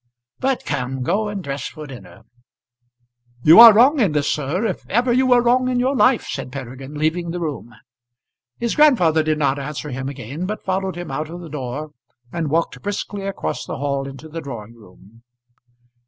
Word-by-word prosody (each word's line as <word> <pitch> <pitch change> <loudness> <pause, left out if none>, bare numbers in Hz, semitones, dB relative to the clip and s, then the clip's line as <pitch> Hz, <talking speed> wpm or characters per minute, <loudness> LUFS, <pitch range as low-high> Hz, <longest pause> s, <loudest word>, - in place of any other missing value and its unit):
But, 265 -1 -1
come, 130 -2 -3
go 200 +10 0
and 200 -2 -5
dress 140 -2 -4
for 155 -1 -9
dinner." 110 -8 -12 1.2
"You 160 +7 +8
are 235 -1 +12
wrong 255 +8 +5
in 200 -10 +2
this, 145 -1 0
sir, 150 +9 -1
if 195 - -3
ever 240 +4 +2
you 260 +1 +3
were 245 -1 +5
wrong 255 +1 +2
in 250 -1 0
your 260 +3 +1
life," 255 -2 +3
said 135 -2 -5
Peregrine, 135 +1 -8
leaving 160 +3 -1
the 175 +1 -4
room. 140 -8 -5 0.8
His 235 -1 -1
grandfather 185 - +4
did 155 0 0
not 140 -2 +1
answer 150 +1 -5
him 130 +1 -4
again, 140 +6 -6
but 215 +1 -5
followed 190 -1 -1
him 175 -4 -6
out 150 +3 -3
of 175 +2 -8
the 170 - -9
door, 145 +1 -5 0.4
and 165 -3 -2
walked 165 +3 -1
briskly 200 -1 -4
across 195 - -4
the - - -6
hall 140 -1 -2
into 135 +3 -10
the 165 +1 -7
drawing 115 -6 -8
room. 110 0 -19
155 Hz, 185 wpm, -20 LUFS, 135-205 Hz, 1.2 s, are